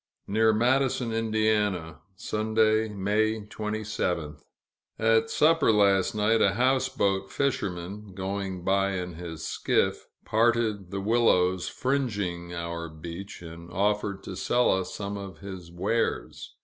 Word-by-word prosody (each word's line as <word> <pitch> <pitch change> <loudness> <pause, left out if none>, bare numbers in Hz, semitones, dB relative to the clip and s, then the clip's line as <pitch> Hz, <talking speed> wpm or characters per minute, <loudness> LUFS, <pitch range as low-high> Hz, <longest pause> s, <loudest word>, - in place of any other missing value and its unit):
Near 110 +2 +3
Madison, 125 +1 +2
Ind., 110 -6 0 0.2
Sunday, 110 +2 +1
May 105 +2 0
27th. 105 -8 -3 0.6
At 115 0 +3
supper 155 0 +4
last 100 -2 +3
night, 110 +2 +3
a - - +3
houseboat 125 -7 +1
fisherman, 100 -6 -3
going 95 -1 -4
by 95 +1 +2
in 90 -1 -4
his 80 -1 -7
skiff, - - 0 0.2
parted 110 -4 +1
the 100 +1 -3
willows 95 -5 +2
fringing 100 -11 -2
our 85 -1 -4
beach, 85 +5 -8
and 85 +1 -10
offered 100 +2 0
to 95 - -6
sell 120 +6 +2
us 95 -1 -1
some 100 0 -4
of 95 -4 -8
his 95 -2 -9
wares. 100 +6 -2
100 Hz, 120 wpm, -27 LUFS, 90-110 Hz, 0.6 s, supper